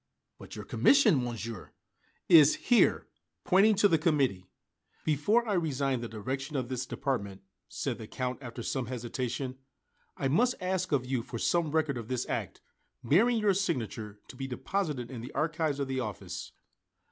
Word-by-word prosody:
"But -, -, -10 dB
your -, -, -7 dB
commission, 220 Hz, -, +4 dB
Monsieur?" 115 Hz, -4 st, -6 dB, 0.5 s
"Is 155 Hz, -3 st, +7 dB
here," 245 Hz, -1 st, +3 dB, 0.4 s
pointing 205 Hz, +3 st, +5 dB
to 205 Hz, +1 st, +5 dB
the 165 Hz, -5 st, +2 dB
committee. 135 Hz, -, +1 dB, 0.6 s
"Before 205 Hz, -, +2 dB
I 210 Hz, -, 0 dB
resign 140 Hz, -7 st, 0 dB
the 120 Hz, -, -4 dB
direction 135 Hz, +7 st, -5 dB
of 130 Hz, -2 st, -2 dB
this 130 Hz, 0 st, -3 dB
department," 100 Hz, -9 st, -3 dB, 0.3 s
said -, -, -3 dB
the 110 Hz, -, -8 dB
Count 130 Hz, +2 st, -4 dB
after 120 Hz, -2 st, -7 dB
some 130 Hz, 0 st, -2 dB
hesitation, 125 Hz, +1 st, -4 dB, 0.6 s
"I 135 Hz, -, 0 dB
must 240 Hz, -, +2 dB
ask 185 Hz, -1 st, -1 dB
of 135 Hz, -4 st, +1 dB
you 130 Hz, -1 st, -1 dB
for 115 Hz, +1 st, -7 dB
some 170 Hz, +6 st, +1 dB
record 155 Hz, -4 st, 0 dB
of 115 Hz, -, -8 dB
this 125 Hz, 0 st, -2 dB
act, -, -, -4 dB, 0.4 s
bearing 215 Hz, -, +4 dB
your 210 Hz, -2 st, +3 dB
signature, 115 Hz, -, -3 dB
to -, -, -11 dB
be 135 Hz, +1 st, -5 dB
deposited 135 Hz, -2 st, -3 dB
in 120 Hz, -3 st, -6 dB
the 125 Hz, -, -9 dB
archives 155 Hz, -2 st, 0 dB
of 140 Hz, -, -1 dB
the 130 Hz, 0 st, -2 dB
office." 110 Hz, -6 st, -5 dB
135 Hz, 165 wpm, -30 LUFS, 120-165 Hz, 0.6 s, Is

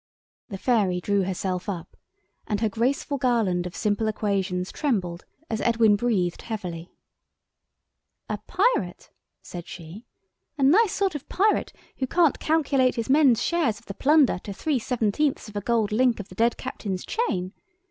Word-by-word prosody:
The 195 Hz, -, -5 dB
fairy 200 Hz, -5 st, +1 dB
drew 200 Hz, +1 st, +1 dB
herself 185 Hz, 0 st, -3 dB
up, 175 Hz, -5 st, -6 dB, 0.5 s
and 210 Hz, -2 st, -1 dB
her 220 Hz, 0 st, +1 dB
graceful 265 Hz, +6 st, -1 dB
garland 220 Hz, -9 st, +1 dB
of 180 Hz, -, -10 dB
simple 210 Hz, +1 st, 0 dB
equations 195 Hz, -4 st, -1 dB
trembled 185 Hz, -, -2 dB, 0.2 s
as 220 Hz, -1 st, -2 dB
Edwin 225 Hz, -3 st, +4 dB
breathed 205 Hz, -6 st, 0 dB
heavily. 180 Hz, -6 st, -6 dB, 1.4 s
"A -, -, -3 dB
Pirate," 435 Hz, +7 st, 0 dB, 0.3 s
said 175 Hz, -1 st, -8 dB
she, 180 Hz, +7 st, -10 dB, 0.5 s
"a 280 Hz, -, 0 dB
nice 375 Hz, +9 st, +5 dB
sort 390 Hz, -2 st, 0 dB
of 295 Hz, -2 st, -7 dB
pirate 415 Hz, +3 st, +1 dB, 0.3 s
who 260 Hz, -, -1 dB
can't 330 Hz, +1 st, +3 dB
calculate 275 Hz, -5 st, +2 dB
his 230 Hz, +1 st, -2 dB
men's 275 Hz, -5 st, +5 dB
share 340 Hz, -5 st, +1 dB
of 225 Hz, +2 st, -6 dB
the 200 Hz, -, -6 dB
plunder 285 Hz, -, +3 dB
to 200 Hz, -, -7 dB
three 280 Hz, +6 st, -1 dB
seventeenths 245 Hz, +3 st, 0 dB
of 210 Hz, -, -12 dB
a 205 Hz, -, -2 dB
gold 225 Hz, -1 st, +1 dB
link 240 Hz, +1 st, +2 dB
of 205 Hz, -, -7 dB
the -, -, -11 dB
dead 230 Hz, +5 st, +1 dB
captain's 200 Hz, -7 st, -5 dB
chain! 190 Hz, -, -2 dB
220 Hz, 155 wpm, -25 LUFS, 190-270 Hz, 1.4 s, nice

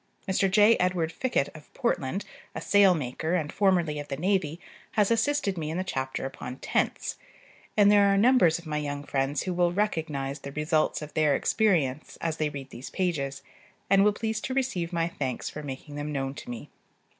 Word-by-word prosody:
Mr. 190 Hz, 0 st, +2 dB
J. 210 Hz, +4 st, +6 dB
Edward 180 Hz, -3 st, 0 dB
Fickett 225 Hz, -, -1 dB
of 150 Hz, -1 st, -13 dB
Portland, 195 Hz, -, -1 dB, 0.3 s
a -, -, -2 dB
sailmaker, 170 Hz, -5 st, +3 dB
and 150 Hz, -1 st, -5 dB
formerly 175 Hz, -7 st, +2 dB
of 145 Hz, -, -6 dB
the 135 Hz, -, -4 dB
navy, 175 Hz, -2 st, 0 dB, 0.3 s
has 210 Hz, 0 st, +3 dB
assisted 230 Hz, -5 st, +1 dB
in 160 Hz, +1 st, -3 dB
the 185 Hz, -, 0 dB
chapter 130 Hz, -8 st, -3 dB
upon 130 Hz, -1 st, -6 dB
tents; -, -, -1 dB, 0.6 s
and 205 Hz, -1 st, +7 dB
there 200 Hz, -1 st, +6 dB
are 195 Hz, -, +3 dB
numbers 210 Hz, -7 st, +5 dB
of 170 Hz, -, -12 dB
my 150 Hz, -1 st, -2 dB
young 145 Hz, -1 st, -4 dB
friends 135 Hz, 0 st, -1 dB
who 185 Hz, -, -2 dB
will 175 Hz, 0 st, +2 dB
recognize 160 Hz, -8 st, -1 dB
the 140 Hz, -, -8 dB
results 155 Hz, +1 st, +1 dB
of 150 Hz, -, -9 dB
their 150 Hz, -3 st, +3 dB
experience, 155 Hz, -11 st, +1 dB
as 165 Hz, -1 st, -2 dB
they 155 Hz, -1 st, 0 dB
read 140 Hz, -2 st, -8 dB
these 125 Hz, -, -8 dB
pages, 145 Hz, -7 st, -2 dB, 0.5 s
and 195 Hz, 0 st, +6 dB
will 210 Hz, -, +5 dB
please 220 Hz, +1 st, -3 dB
to 260 Hz, -, -3 dB
receive 190 Hz, -11 st, -1 dB
my 165 Hz, -1 st, 0 dB
thanks 130 Hz, -7 st, -4 dB
for 150 Hz, -, -6 dB
making 145 Hz, +1 st, -7 dB
them 145 Hz, +1 st, -4 dB
known 135 Hz, -2 st, -2 dB
to -, -, -10 dB
me. 120 Hz, -2 st, -7 dB
165 Hz, 190 wpm, -27 LUFS, 145-195 Hz, 0.6 s, and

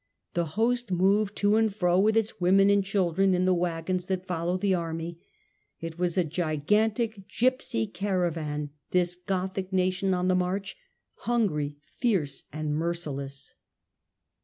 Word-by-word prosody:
The 170 Hz, -1 st, +1 dB
host 240 Hz, -1 st, +1 dB
moved 195 Hz, +3 st, +2 dB
to 205 Hz, +1 st, +3 dB
and 225 Hz, -1 st, +3 dB
fro 180 Hz, -2 st, +2 dB
with 215 Hz, +3 st, +3 dB
its 220 Hz, -4 st, -1 dB
women 195 Hz, +3 st, +5 dB
and 200 Hz, -1 st, +4 dB
children 190 Hz, -1 st, +2 dB
in 180 Hz, +1 st, +1 dB
the 185 Hz, -, +4 dB
waggons 180 Hz, +1 st, -1 dB
that 185 Hz, -1 st, -2 dB
followed 180 Hz, 0 st, -1 dB
the 200 Hz, -2 st, +2 dB
army. 165 Hz, -1 st, -3 dB, 0.6 s
It 165 Hz, 0 st, -7 dB
was 180 Hz, 0 st, 0 dB
a 180 Hz, -, +4 dB
gigantic 195 Hz, -, 0 dB
gipsy 245 Hz, -, 0 dB
caravan 165 Hz, -, -2 dB
— -, -, -54 dB
this 180 Hz, -1 st, +2 dB
Gothic 190 Hz, +1 st, -3 dB
nation 185 Hz, +1 st, +1 dB
on 180 Hz, 0 st, 0 dB
the 185 Hz, -, +3 dB
march, 185 Hz, +2 st, -1 dB, 0.4 s
hungry, 155 Hz, -12 st, 0 dB, 0.2 s
fierce 180 Hz, -, 0 dB
and 155 Hz, 0 st, -3 dB
merciless. 145 Hz, -4 st, -4 dB
180 Hz, 145 wpm, -27 LUFS, 165-200 Hz, 0.6 s, women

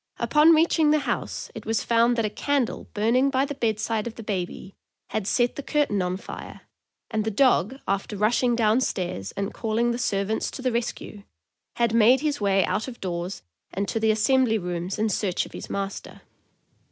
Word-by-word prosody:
Upon 310 Hz, +2 st, +5 dB
reaching 320 Hz, -1 st, +3 dB
the 305 Hz, 0 st, +3 dB
house, -, -, -3 dB
it -, -, -8 dB
was 225 Hz, -1 st, 0 dB
found 235 Hz, +1 st, +3 dB
that 230 Hz, -2 st, 0 dB
a -, -, 0 dB
candle 280 Hz, -2 st, -1 dB
burning 235 Hz, +6 st, +3 dB
by 270 Hz, 0 st, +1 dB
the 285 Hz, -, -5 dB
bed 225 Hz, -5 st, -1 dB
side 220 Hz, 0 st, -1 dB
of 230 Hz, -, -7 dB
the 225 Hz, -, -8 dB
baby 190 Hz, -1 st, -4 dB, 0.4 s
had 215 Hz, -3 st, -2 dB
set 240 Hz, +1 st, +1 dB
the -, -, -4 dB
curtain 285 Hz, -9 st, 0 dB
on 180 Hz, 0 st, -1 dB
fire, -, -, -9 dB, 0.5 s
and 215 Hz, -1 st, 0 dB
the 220 Hz, -, -1 dB
dog, 240 Hz, 0 st, +3 dB
after 200 Hz, +1 st, -2 dB
rushing 235 Hz, +4 st, +2 dB
down 225 Hz, +1 st, +3 dB
stairs 175 Hz, -, -3 dB
and 200 Hz, +2 st, -3 dB
calling 230 Hz, +1 st, 0 dB
the 235 Hz, -, -3 dB
servants 205 Hz, -2 st, -1 dB
to 255 Hz, -, -8 dB
the 255 Hz, -, +1 dB
rescue, 230 Hz, -3 st, -4 dB, 0.5 s
had 235 Hz, -2 st, +1 dB
made 235 Hz, +3 st, +5 dB
his 295 Hz, -5 st, -1 dB
way 195 Hz, -1 st, +3 dB
out 220 Hz, -, -2 dB
of 250 Hz, -2 st, -8 dB
doors 175 Hz, 0 st, -4 dB, 0.3 s
and 200 Hz, +2 st, -2 dB
to 225 Hz, -, -1 dB
the 220 Hz, 0 st, +2 dB
assembly 225 Hz, +2 st, +3 dB
rooms 180 Hz, -1 st, -4 dB
in 215 Hz, +1 st, +1 dB
search 195 Hz, -3 st, -1 dB
of -, -, -13 dB
his -, -, -8 dB
master. 195 Hz, 0 st, -5 dB
220 Hz, 195 wpm, -25 LUFS, 200-250 Hz, 0.5 s, Upon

